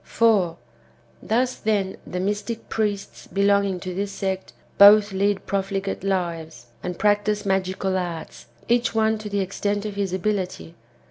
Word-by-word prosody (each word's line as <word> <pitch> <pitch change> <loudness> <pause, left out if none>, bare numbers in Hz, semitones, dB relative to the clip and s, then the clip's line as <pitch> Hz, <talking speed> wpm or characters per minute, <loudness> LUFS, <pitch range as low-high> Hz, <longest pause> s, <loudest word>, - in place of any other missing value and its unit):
4. 200 -8 +2 0.6
Thus, 250 +3 0
then, 200 -3 0
the 180 - -4
mystic 210 +4 -3
priests 205 -3 -2
belonging 200 0 +2
to 185 -1 -5
this 200 +2 -3
sect 190 -1 -3 0.3
both 205 +1 +8
lead 195 0 0
profligate 195 -1 -2
lives 170 -9 -2 0.2
and 180 -1 -4
practise 210 0 +1
magical 190 0 0
arts, 175 -3 -5 0.2
each 240 -1 +2
one 220 0 +2
to 215 -1 -6
the 200 -1 0
extent 205 +2 -2
of 210 - -3
his 200 -2 -1
ability. 185 -3 -2
200 Hz, 140 wpm, -23 LUFS, 185-210 Hz, 0.6 s, both